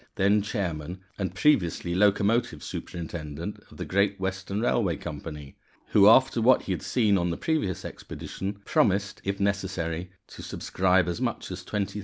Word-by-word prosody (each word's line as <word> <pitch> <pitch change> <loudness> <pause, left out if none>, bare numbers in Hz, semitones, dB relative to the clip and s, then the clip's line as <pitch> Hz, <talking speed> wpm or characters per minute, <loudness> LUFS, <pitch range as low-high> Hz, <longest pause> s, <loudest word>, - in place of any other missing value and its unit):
then 100 +2 +3
chairman, 90 -4 -3 0.2
and 95 -2 -2
previously 90 - +2
locomotive 100 -1 +2
superintendent 80 -4 -6
of - - -15
the - - -4
Great 100 +1 +1
Western 95 +1 -3
Railway 105 -6 +1
Company, 75 -3 -7 0.3
who, 100 0 +7
after 130 0 +5
what 125 +3 +5
he - - -4
had 90 - -2
seen 100 0 +2
on 85 0 0
the 85 - -2
previous 150 - -1
expedition, 95 +1 -6
promised, 100 +1 +1
if 100 0 -2
necessary, 95 -4 -1 0.2
to - - -10
subscribe 90 -1 +1
as 90 +7 -3
much 120 -6 -2
as 90 0 -6
£20,000. 100 +1 -3
95 Hz, 155 wpm, -27 LUFS, 85-105 Hz, 0.3 s, who